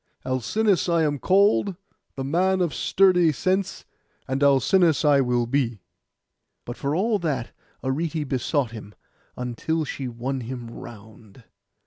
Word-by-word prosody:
Alcinous 180 - +1
I 170 -1 +3
am 145 -2 0
called, 200 - +3 0.4
the 135 - -4
man 185 +7 +1
of 175 -5 0
sturdy 180 +1 +3
sense; 185 +6 -1 0.4
and 135 +1 -2
Alcinous 145 +4 +3
I 145 -2 +5
will 125 -2 +1
be.' 120 -6 -1 0.8
But 120 - -6
for 140 +3 -2
all 210 +4 +1
that 140 -9 -2 0.3
Arete 150 +3 -2
besought 130 -1 -1
him, 105 -2 -10 0.4
until 125 +6 -2
she 135 -2 -5
won 125 +3 -4
him 120 -1 -7
round. 110 0 -13
140 Hz, 130 wpm, -24 LUFS, 125-175 Hz, 0.8 s, I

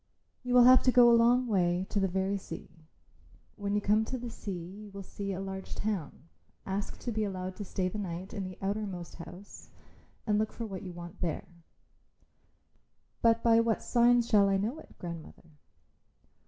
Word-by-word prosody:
You 250 -1 -1
will 245 - +9
have 255 +1 +8
to 255 - +6
go 245 -1 +7
a - - +6
long 240 +2 +5
way, 180 -4 +1
to 205 - +1
the 195 - +2
very 190 +2 0
sea. 165 -3 -9 0.7
When 205 0 -2
you 210 - +1
come 210 +2 +3
to 260 - -4
the 240 -1 -6
sea 180 -7 -6 0.2
you 210 - -10
will 200 0 -8
see 200 +1 -5
a 185 - -3
large 190 0 -6
town. 180 -8 -4 0.4
Ask 195 +1 -3
to 240 - -3
be 220 -1 -1
allowed 185 -2 -4
to 205 - -4
stay 185 -1 -2
the 210 +3 -4
night 185 -1 -5
in 200 -3 -3
the 185 -1 -7
outermost 195 -4 -3
house 180 +3 -11 0.6
and 210 -1 +2
look 215 0 0
for 230 - -5
what 195 -4 -6
you 185 - -7
want 175 +2 -10
there." 170 -3 -2 1.8
"But 230 0 +4
by 230 -1 +6
what 230 -1 +1
signs 240 -1 +4
shall 200 -3 +5
I 195 - +3
know 225 +10 -2
it, - - -16
grandmother?" 170 -1 -9
200 Hz, 190 wpm, -30 LUFS, 185-225 Hz, 1.8 s, will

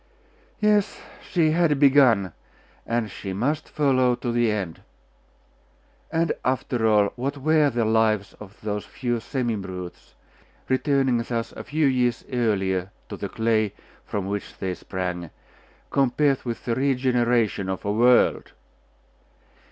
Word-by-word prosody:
Yes, 210 -2 +2 0.3
she 165 -4 +3
had 160 -3 +2
begun, 130 - +5 0.5
and 115 -3 -1
she 95 0 -6
must 145 +10 -1
follow 130 -4 +2
to 120 0 -3
the 120 -1 +2
end.... 95 -6 -4 1.3
And, 165 0 +1
after 125 -3 0
all, 105 -2 +3
what 140 +3 -3
were 150 +1 +3
the 120 -3 0
lives 110 -2 +1
of 105 -1 -12
those 105 -1 -3
few 120 -2 -3
semi 120 -1 -2
brutes, 90 -3 -8 0.5
returning 130 -2 +2
thus 115 -1 -3
a - - -8
few 155 +1 0
years 125 -3 +1
earlier 95 -6 0 0.2
to 100 - -5
the 100 - -5
clay 110 -2 0 0.3
from 100 -2 -4
which 100 +1 -5
they 95 -1 -2
sprang, 90 -2 -5 0.6
compared 135 +1 +2
with 120 -1 -5
the 120 - 0
regeneration 125 -6 +1
of 95 +1 -4
a 100 - 0
world?.... 120 +3 +3
120 Hz, 130 wpm, -24 LUFS, 105-135 Hz, 1.3 s, begun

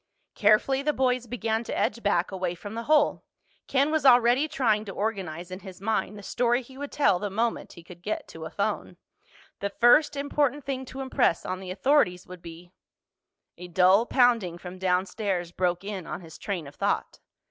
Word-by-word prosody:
Carefully 215 +6 +3
the 300 +1 0
boys 255 -2 0
began 225 -1 -2
to - - -4
edge 235 - 0
back, 200 -4 +1
away 185 -2 -2
from 205 +4 -9
the 230 +1 -5
hole. 300 -1 +3 0.4
Ken 280 +3 +2
was 315 -2 +1
already 250 +2 +5
trying 220 -8 +1
to 200 - -6
organize 185 -5 -4
in 185 - -6
his 190 -3 -11
mind 210 0 -1
the 205 - -10
story 240 +4 +1
he 260 +2 -15
would 285 +1 -6
tell 200 -11 +2
the 205 - -3
moment 225 +4 -2
he 170 - -13
could 175 0 -13
get 210 +4 -4
to - - -8
a - - -5
phone. - - -3 0.6
The 200 - -2
first 240 +9 +4
important 285 -1 0
thing 265 -1 -3
to 265 +1 -7
impress 260 -9 +1
on 185 - -3
the 190 -1 -8
authorities 190 -2 +2
would 180 -1 -11
be— 170 +1 -11 0.9
A 180 - -8
dull 185 +6 +4
pounding 235 -9 +2
from 180 +1 -9
downstairs 185 -1 -1
broke 180 0 -1
in 195 -4 -6
on - - -5
his 165 -2 -12
train 190 -7 -4
of 140 - -11
thought. - - -2
210 Hz, 190 wpm, -26 LUFS, 180-255 Hz, 0.9 s, already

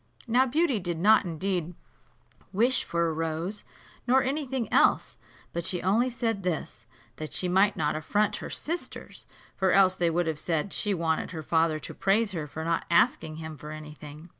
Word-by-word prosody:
Now 250 +2 +3
Beauty 285 -3 +1
did 175 -3 -3
not 210 +5 +5
indeed 175 0 -2 0.8
wish 240 +6 +2
for 170 0 0
a 160 - -1
rose, 165 +5 -3 0.4
nor 260 +2 +4
any 275 +2 -2
thing 250 -3 -2
else, - - +3 0.4
but 170 - -2
she 180 +1 0
only 220 +7 +2
said 230 -4 -2
this, 180 -4 -4 0.3
that 155 -1 -6
she 180 - +1
might 190 +3 +3
not 150 -1 0
affront 205 +7 0
her - - -7
sisters, 335 +3 -5 0.3
for 190 -1 +2
else 190 -1 +5
they 175 -2 +1
would 175 +1 0
have 160 -2 -2
said 165 +4 -2
she 205 -2 +1
wanted 165 -2 -1
her 160 -3 -6
father 160 0 +2
to - - -7
praise 205 +2 +2
her 160 -5 -4
for 160 +2 -6
not 165 0 0
asking 160 -2 +2
him 160 0 -7
for 150 - -9
any 155 0 -8
thing. 150 +3 -11
180 Hz, 190 wpm, -27 LUFS, 160-215 Hz, 0.8 s, not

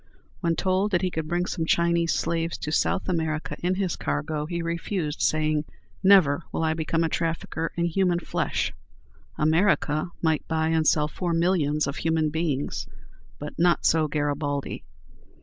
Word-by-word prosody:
When 170 -2 +1
told 190 +3 +1
that 175 -3 +1
he 185 - 0
could 160 -2 -3
bring 175 +2 0
some 165 -3 -3
Chinese 170 0 +2
slaves 165 0 -1
to 150 - -4
South 190 +4 +1
America 160 -3 -1
in 180 +1 +1
his 185 -3 -1
cargo, 150 - -2
he 170 0 -3
refused, 170 -2 -3
saying, 155 -1 +1 0.4
"Never 180 -6 +6
will - - -1
I 160 0 +2
become 165 +1 0
a - - +2
trafficker 165 0 -2
in 170 - 0
human 175 +1 +2
flesh." 175 - -2 0.6
America 155 -1 +2
might 160 -2 0
buy 160 -1 0
and 160 -1 +2
sell 150 -1 +3
four 175 +2 -3
millions 165 -4 +2
of 140 +1 -4
human 160 -1 +1
beings, 150 -3 -2 0.5
but 150 0 -7
not 175 0 +3
so 160 -1 +3
Garibaldi. 145 -1 -2
165 Hz, 160 wpm, -25 LUFS, 155-170 Hz, 0.6 s, Never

